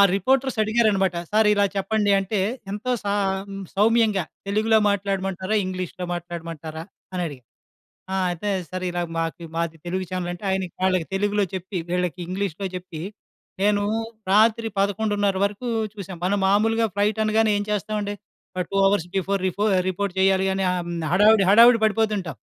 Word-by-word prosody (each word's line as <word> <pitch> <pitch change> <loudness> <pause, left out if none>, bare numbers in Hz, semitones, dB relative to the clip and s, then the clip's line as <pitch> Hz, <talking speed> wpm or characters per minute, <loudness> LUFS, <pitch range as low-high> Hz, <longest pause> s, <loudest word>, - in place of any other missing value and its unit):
రిపోర్టర్సడిగారనమాట. 215 -4 +2 0.2
సారిలా 210 -1 +4
చెప్పండి 205 +1 +1
అంటే, 195 +1 -1 0.3
ఎంతో 210 +5 -3
సా 200 0 0 0.3
హ్మ్, 195 0 -6
సౌమ్యంగా 215 -2 +3 0.2
తెలుగులో 220 +2 +3
మాట్లాడమంటారా? 195 0 -2
ఇంగ్లీష్‌లో 185 -1 -4
మాట్లాడమంటారా? 165 -2 -6 0.3
అని 180 -1 -2
అడిగారు. 135 -6 -9 0.7
ఆ! - - 0 0.2
అయితే, 175 +4 -3 0.2
సరే. 185 0 -3
ఇలాగ 175 0 -2
మాకు 165 +1 -3
మాది 165 -1 -2
తెలుగు 185 +1 -2
ఛానెలంటే, 175 0 -4
ఆయనకి 190 -3 -2
వాళ్ళకి 185 -3 +1
తెలుగులో 205 +1 +1
చెప్పి, 185 +1 -4
వీళ్ళకి 180 0 -1
ఇంగ్లీష్‌లో 195 0 -3
చెప్పి, 180 -3 -7 0.6
నేను 205 0 +3 0.5
రాత్రి 225 +2 +4
11:30 205 0 +1
వరకు 210 +5 -4 0.2
చూసాం. 195 -4 -8
మనం 195 +3 +1
మామూలుగా 225 +3 +3
ఫ్లైటనగానే 215 +1 +2
ఏం 205 - -1
చేస్తావండి? 210 0 -2 0.4
ఆ - - +1
2 195 - 0
అవర్స్ 195 -4 +1
బిఫోర్ 195 +1 -1
రిపో 195 +3 -2 0.3
రిపోర్ట్ 190 +1 -2
చేయాలి 190 0 +3
అని, 195 0 -1
ఆహ్, 180 -1 -1
హ్మ్. 170 -2 -3
హడావిడి, 205 +2 +5
హడావిడి 230 +2 +7
పడిపోతుంటాం. 210 - 0
195 Hz, 140 wpm, -23 LUFS, 180-210 Hz, 0.7 s, హడావిడి